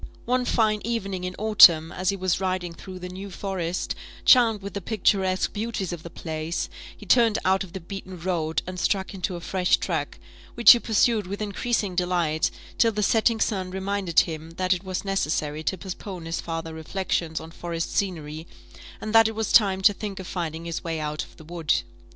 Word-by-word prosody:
One 250 +1 +1
fine 215 -3 +2
evening 195 -5 -3
in 180 0 -4
autumn, 175 -7 +7
as 185 +1 -1
he 200 - +1
was 185 -2 0
riding 185 -2 -2
through 185 +2 -10
the 180 0 -7
New 190 +2 -7
Forest, 185 -2 -3 0.3
charmed 225 -5 +5
with 200 -2 -6
the 200 - -4
picturesque 190 -2 +1
beauties 210 -4 -3
of 170 - -6
the 170 - -9
place, 160 0 -4 0.3
he - - -12
turned 230 -3 +4
out 190 +1 +3
of 180 -3 -12
the 190 - -5
beaten 185 0 -8
road, 165 -2 -1
and 185 0 -6
struck 190 +2 0
into 185 -1 -3
a - - -5
fresh 180 +1 +1
track, - - -3 0.4
which 235 - +9
he 240 - +7
pursued 220 -2 +2
with 200 +2 -5
increasing 210 -1 -1
delight, 175 -3 +1 0.3
till 230 - +5
the 210 0 -1
setting 225 +2 +3
sun 190 -5 -1
reminded 190 -2 +1
him 160 -1 -6
that 185 0 +2
it 180 +1 -5
was 190 0 -4
necessary 155 -5 -1
to 190 - 0
postpone 185 -1 -7
his 165 +1 -3
farther 165 -1 -5
reflections 160 0 -2
on 160 +1 -10
forest 170 -1 -4
scenery, 160 -4 -3 0.5
and 215 - -5
that 225 -1 +7
it 220 - -4
was 220 -1 -2
time 195 -4 +4
to 205 - +6
think 200 -1 -6
of 190 - -7
finding 165 -2 -4
his 170 -1 -4
way 165 -1 -3
out 150 0 -3
of - - -16
the - - -13
wood. 165 -1 0
185 Hz, 200 wpm, -25 LUFS, 170-205 Hz, 0.5 s, which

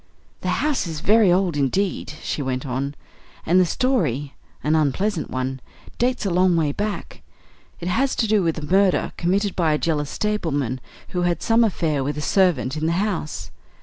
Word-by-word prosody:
"The - - -2 0.2
house 295 - 0
is 160 -2 -4
very 210 +1 +4
old 180 -2 +2
indeed," 150 +4 0
she - - -2
went 130 -1 -2
on, 135 +2 -3 0.5
"and 180 +3 +4
the 180 - +4
story 150 - 0 0.3
an 155 +1 +2
unpleasant 160 +5 0
one 130 +1 -3 0.4
dates 250 -2 +1
a 195 - 0
long 180 0 +3
way 155 -3 +2
back. 205 +6 -4 0.6
It 175 - -5
has 260 +9 +1
to 230 - +1
do 210 -1 +3
with 165 -3 0
a 155 - -4
murder 190 +3 +2
committed 195 +3 0
by 165 -4 +2
a - - +2
jealous 150 -3 -1
stableman 145 - -1 0.3
who 180 - -2
had 175 -2 0
some 230 +1 +4
affair 160 -9 0
with 145 +2 -2
a - - -2
servant 160 -7 +2
in 155 +1 -1
the 165 - +1
house. 165 - -2
170 Hz, 180 wpm, -22 LUFS, 145-200 Hz, 0.6 s, very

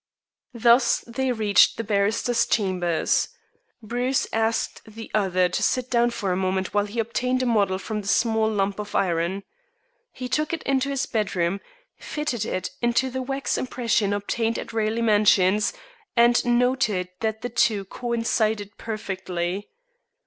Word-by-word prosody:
Thus 235 +2 +4
they 260 +2 -1
reached 215 -4 +4
the 230 - -2
barrister's 220 +3 +1
chambers. 180 -5 +1 0.6
Bruce 245 +4 0
asked 225 0 0
the 225 +1 -11
other 185 -3 +2
to 180 - -2
sit 255 -1 0
down 240 -1 +3
for 205 -5 -3
a - - +1
moment 190 0 -1
while 205 0 +2
he 210 +3 -9
obtained 250 +3 0
a - - 0
model 205 -5 +2
of 190 - -8
the 210 -3 -3
small 220 +1 +2
lump 200 -1 -1
of 210 0 -6
iron. 180 +1 0 0.7
He 255 - -6
took 305 +5 -1
it 330 - -3
into 275 0 0
his 275 -2 -1
bedroom, 195 -4 -1 0.4
fitted 275 -8 -3
in 185 -5 -2 0.2
into 240 +2 +1
the 260 +1 -3
wax 270 +1 -2
impression 230 -5 0
obtained 225 +3 -1
at - - -7
Raleigh 225 +1 0
Mansions, 210 -2 +4 0.5
and 240 +1 +5
noted 240 -6 +1
that 220 -1 -2
the 245 - -2
two 210 -4 +1
coincided 220 -2 -1
perfectly. 190 -3 -4
220 Hz, 150 wpm, -24 LUFS, 200-240 Hz, 0.7 s, and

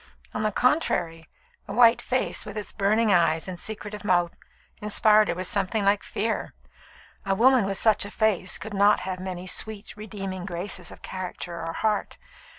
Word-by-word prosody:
On 215 - -2
the 215 0 +1
contrary, 175 - 0 0.4
the 200 - -5
white 235 +1 +6
face, 255 0 -1
with 210 0 -8
its 210 - -5
burning 215 +1 +2
eyes 165 -1 +2
and 180 -2 -6
secretive 210 0 -6
mouth, 175 -3 +2 0.5
inspired 210 0 +4
her - - -1
with 185 +1 -4
something 200 +2 0
like 200 +1 +3
fear. 220 +1 -3 0.7
A 195 0 0
woman 250 +1 +5
with 195 -1 -2
such 215 0 +3
a 205 - -6
face 215 -4 +1
could 220 0 -8
not 205 +1 +4
have 185 -1 -4
many 185 -1 -5
sweet, 205 +2 -5
redeeming 195 -3 -6
graces 180 -1 -4
of - - -14
character 180 -2 -6
or 165 0 -4
heart. 215 +2 -1
200 Hz, 170 wpm, -26 LUFS, 185-215 Hz, 0.7 s, white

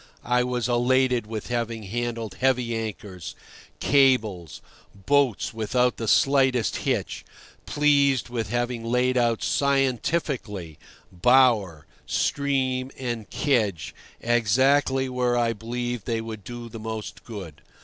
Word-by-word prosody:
I 125 +1 +2
was 125 -2 -1
elated 125 -1 +2
with 110 0 -6
having 115 -2 -2
handled 115 -1 -4
heavy 125 -3 +1
anchors, 105 -6 -6 0.4
cables, 110 - +2 0.4
boats 130 +3 +1
without 120 +3 0
the 115 - -4
slightest 130 -2 +3
hitch; - - -2 0.4
pleased 140 -3 +3
with 115 -4 -4
having 120 0 -2
laid 125 +2 +1
out 120 -2 +1
scientifically 130 - -1 0.3
bower, 105 - +3 0.2
stream, 130 -2 0
and 120 -5 -4
kedge 105 - 0 0.3
exactly 130 +4 +2
where 125 -1 0
I 115 -1 +1
believed 120 +1 -4
they 115 -1 0
would 110 -2 -7
do 120 +2 -8
most 110 -2 -7
good. 90 -9 -9
120 Hz, 110 wpm, -25 LUFS, 110-130 Hz, 0.4 s, slightest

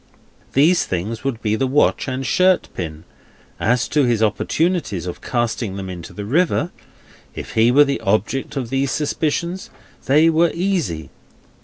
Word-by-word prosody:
Those 160 +6 +4
things 105 +6 -4
would 130 -4 -3
be 110 -1 +1
the 130 +4 0
watch 145 +2 +2
and 130 0 -3
shirt 185 +8 +3
pin. 80 -3 -6 0.6
As 120 +2 +1
to 150 -1 +2
his 120 -3 +2
opportunities 155 - 0
of 90 - -6
casting 120 -4 -2
them 95 -1 -5
into 85 -2 -8
the 105 - -7
river; 165 - +1 0.6
if - - -7
he 115 +1 +4
were 145 +4 +7
the 140 - -1
object 130 +8 -1
of 125 -4 -3
these 135 0 0
suspicions, 160 +5 -2 0.4
they 150 +5 +5
were 165 +1 +4
easy. 165 - -2
130 Hz, 155 wpm, -20 LUFS, 105-155 Hz, 0.6 s, were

